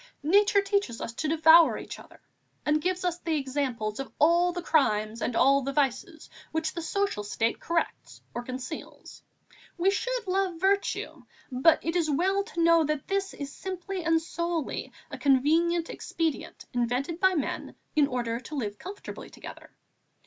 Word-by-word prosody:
Nature 400 Hz, +5 st, +4 dB
teaches 395 Hz, -, -1 dB
us 230 Hz, -, -5 dB
to 310 Hz, -, -3 dB
devour 320 Hz, +1 st, +6 dB
each -, -, -8 dB
other -, -, -16 dB, 0.5 s
and 300 Hz, +1 st, +2 dB
gives 365 Hz, +2 st, -1 dB
us 350 Hz, -1 st, -1 dB
the 330 Hz, -2 st, -1 dB
example 265 Hz, -5 st, -2 dB
of 270 Hz, -, -5 dB
all 340 Hz, +3 st, +4 dB
the 355 Hz, -, -4 dB
crimes 220 Hz, -8 st, +1 dB
and 235 Hz, -, -1 dB
all 275 Hz, +3 st, +5 dB
the 275 Hz, +1 st, -3 dB
vices 280 Hz, +3 st, -1 dB, 0.2 s
which 320 Hz, 0 st, -1 dB
the 340 Hz, -, -4 dB
social 400 Hz, -, -1 dB
state 225 Hz, +3 st, -1 dB
corrects 335 Hz, 0 st, -2 dB
or 240 Hz, -, -3 dB
conceals. 255 Hz, +5 st, -8 dB, 0.6 s
We 365 Hz, +3 st, +3 dB
should -, -, -2 dB
love 375 Hz, -2 st, 0 dB
virtue; 395 Hz, +2 st, 0 dB, 0.3 s
but 260 Hz, +6 st, +4 dB
it 330 Hz, +1 st, -1 dB
is 335 Hz, -3 st, +1 dB
well 380 Hz, +7 st, +1 dB
to 380 Hz, -7 st, -2 dB
know 335 Hz, -1 st, +5 dB
that 305 Hz, -2 st, -2 dB
this 390 Hz, 0 st, -1 dB
is 280 Hz, -1 st, -6 dB
simply 375 Hz, 0 st, -5 dB
and 325 Hz, 0 st, +3 dB
solely 335 Hz, -1 st, -3 dB, 0.2 s
a -, -, -6 dB
convenient 320 Hz, +5 st, +3 dB
expedient 325 Hz, -4 st, -3 dB
invented 245 Hz, +7 st, -1 dB
by 375 Hz, 0 st, +4 dB
men 295 Hz, -, -3 dB, 0.2 s
in 295 Hz, -2 st, +4 dB
order 235 Hz, -3 st, -2 dB
to 260 Hz, +5 st, -8 dB
live 210 Hz, -6 st, -3 dB
comfortably 385 Hz, +4 st, -8 dB
together. -, -, -11 dB
320 Hz, 165 wpm, -28 LUFS, 270-355 Hz, 0.6 s, devour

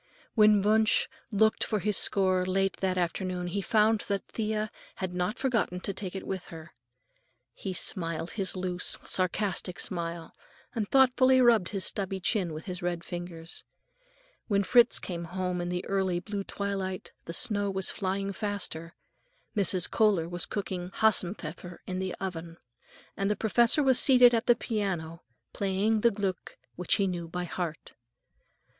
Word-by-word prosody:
When 210 Hz, -3 st, +5 dB
Wunsch 220 Hz, +1 st, +3 dB, 0.2 s
looked 220 Hz, +1 st, +3 dB
for 215 Hz, -, 0 dB
his 210 Hz, +1 st, 0 dB
score 185 Hz, -2 st, +3 dB
late 195 Hz, +1 st, 0 dB
that 185 Hz, -1 st, -1 dB
afternoon, 180 Hz, +1 st, -2 dB
he 190 Hz, +3 st, -2 dB
found 215 Hz, +2 st, +3 dB
that 200 Hz, -1 st, -2 dB
Thea 215 Hz, -1 st, -2 dB, 0.2 s
had 185 Hz, -2 st, -4 dB
not 180 Hz, +5 st, -1 dB
forgotten 230 Hz, -9 st, 0 dB
to 200 Hz, -, -2 dB
take 190 Hz, -1 st, -6 dB
it 190 Hz, -, -5 dB
with 190 Hz, -2 st, -4 dB
her. 160 Hz, -1 st, -11 dB, 0.8 s
He 190 Hz, -, -5 dB
smiled 165 Hz, -2 st, 0 dB
his 195 Hz, -3 st, -3 dB
loose, 180 Hz, -1 st, -1 dB
sarcastic 185 Hz, 0 st, -1 dB
smile, 170 Hz, -2 st, -4 dB, 0.4 s
and 215 Hz, -4 st, -2 dB
thoughtfully 260 Hz, -1 st, +5 dB
rubbed 235 Hz, -7 st, +4 dB
his 195 Hz, -2 st, -1 dB
stubbly 195 Hz, -1 st, -1 dB
chin 185 Hz, -2 st, +1 dB
with 155 Hz, +1 st, -7 dB
his 180 Hz, -3 st, -5 dB
red 175 Hz, -1 st, -2 dB
fingers. 175 Hz, -1 st, -6 dB, 0.8 s
When 200 Hz, -2 st, +2 dB
Fritz 240 Hz, +4 st, +5 dB
came 170 Hz, -2 st, -5 dB
home 180 Hz, 0 st, -3 dB
in 175 Hz, -, -3 dB
the 180 Hz, 0 st, -3 dB
early 190 Hz, -3 st, 0 dB
blue 200 Hz, +2 st, -5 dB
twilight 195 Hz, -2 st, -4 dB
the -, -, -5 dB
snow 205 Hz, +2 st, 0 dB
was 190 Hz, -1 st, 0 dB
flying 195 Hz, +1 st, -2 dB
faster, 185 Hz, -6 st, -4 dB, 0.6 s
Mrs. 190 Hz, -3 st, +3 dB
Kohler 205 Hz, -7 st, +2 dB
was 175 Hz, 0 st, -3 dB
cooking 185 Hz, -3 st, -4 dB
Hasenpfeffer 180 Hz, -4 st, 0 dB
in 185 Hz, 0 st, -4 dB
the 185 Hz, -1 st, -3 dB
kitchen, 170 Hz, -3 st, -5 dB, 0.6 s
and 195 Hz, 0 st, -1 dB
the 210 Hz, -, +1 dB
professor 235 Hz, +7 st, +3 dB
was 260 Hz, -2 st, +4 dB
seated 250 Hz, -2 st, +7 dB
at 230 Hz, 0 st, 0 dB
the 240 Hz, -, +6 dB
piano, 180 Hz, -9 st, -3 dB, 0.3 s
playing 205 Hz, +3 st, +1 dB
the 235 Hz, -, +5 dB
Gluck, 200 Hz, -3 st, -4 dB, 0.2 s
which 180 Hz, -1 st, +1 dB
he 200 Hz, -, +1 dB
knew 175 Hz, -3 st, -3 dB
by 180 Hz, +2 st, -4 dB
heart. 170 Hz, -2 st, -5 dB
190 Hz, 155 wpm, -29 LUFS, 180-210 Hz, 0.8 s, seated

